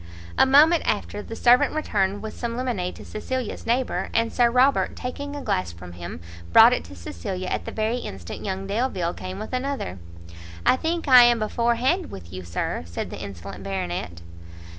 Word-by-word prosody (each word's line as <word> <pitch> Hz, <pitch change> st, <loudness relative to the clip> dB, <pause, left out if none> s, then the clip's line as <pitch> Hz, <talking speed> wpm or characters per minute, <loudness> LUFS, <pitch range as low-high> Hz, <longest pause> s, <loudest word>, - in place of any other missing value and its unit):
A -, -, +5 dB
moment 305 Hz, +5 st, +6 dB
after, 205 Hz, 0 st, -1 dB
the 225 Hz, -, -8 dB
servant 250 Hz, +5 st, +4 dB
returned 205 Hz, -9 st, 0 dB
with 220 Hz, -, -6 dB
some 235 Hz, -1 st, -4 dB
lemonade 230 Hz, -8 st, -2 dB
to -, -, -11 dB
Cecilia's 250 Hz, +1 st, -4 dB
neighbour, 245 Hz, +2 st, 0 dB
and 230 Hz, 0 st, +1 dB
Sir 240 Hz, -1 st, +4 dB
Robert, 255 Hz, +3 st, +3 dB
taking 285 Hz, +3 st, -5 dB
a 285 Hz, -, -6 dB
glass 90 Hz, -2 st, -1 dB
from 85 Hz, +1 st, -11 dB
him, 85 Hz, -1 st, -7 dB, 0.3 s
brought -, -, +8 dB
it -, -, -1 dB
to 95 Hz, +2 st, -11 dB
Cecilia 90 Hz, -, -5 dB
at -, -, -2 dB
the -, -, -5 dB
very 220 Hz, +2 st, -1 dB
instant 95 Hz, -, -7 dB
young 190 Hz, -1 st, -3 dB
Delvile 195 Hz, -5 st, -1 dB
came 185 Hz, +1 st, -7 dB
with 215 Hz, +4 st, -7 dB
another. 255 Hz, -, -3 dB, 0.7 s
"I -, -, +6 dB
think 330 Hz, +4 st, -2 dB
I 255 Hz, -2 st, +9 dB
am 240 Hz, 0 st, +4 dB
before 235 Hz, +2 st, +1 dB
hand 315 Hz, +10 st, 0 dB
with 85 Hz, -1 st, -10 dB
you, 95 Hz, 0 st, -6 dB
Sir," 85 Hz, -1 st, -3 dB
said 85 Hz, -, -5 dB
the -, -, -7 dB
insolent 100 Hz, 0 st, -8 dB
Baronet. 90 Hz, -2 st, -4 dB
220 Hz, 185 wpm, -24 LUFS, -, 0.7 s, I